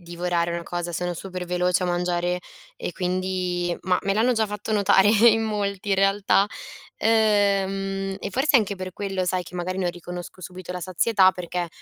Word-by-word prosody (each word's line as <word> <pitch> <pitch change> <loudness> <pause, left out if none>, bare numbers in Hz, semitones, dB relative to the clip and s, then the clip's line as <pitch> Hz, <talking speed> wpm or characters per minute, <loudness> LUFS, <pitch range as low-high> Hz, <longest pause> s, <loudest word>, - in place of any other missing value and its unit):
divorare 175 0 -2
una 170 0 -3
cosa. 175 0 -4
Sono 175 +1 -2
super 180 +1 -6
veloce 180 +1 +1
a - - -1
mangiare 175 0 0 0.4
e - - -4
quindi 180 -1 -1
ma 180 0 +2
me 195 - +1
l'hanno 225 +5 +3
già 220 -2 +1
fatto 210 +1 -5
notare 200 -1 +4
in 225 +1 +5
molti 205 -2 -2
in - - +4
realtà 195 0 +3 0.5
ehm, 195 -3 +1
e - - -5
forse 270 +6 +3
anche 205 -4 +1
per 185 0 -6
quello, 195 -1 -2
sai 180 0 0
che 175 - -13
magari 180 +1 -3
non 180 -2 0
riconosco 175 +1 -9
subito 180 0 -8
la 180 - -5
sazietà, 185 +2 +3
perché 180 -1 -4
185 Hz, 180 wpm, -24 LUFS, 180-200 Hz, 0.5 s, in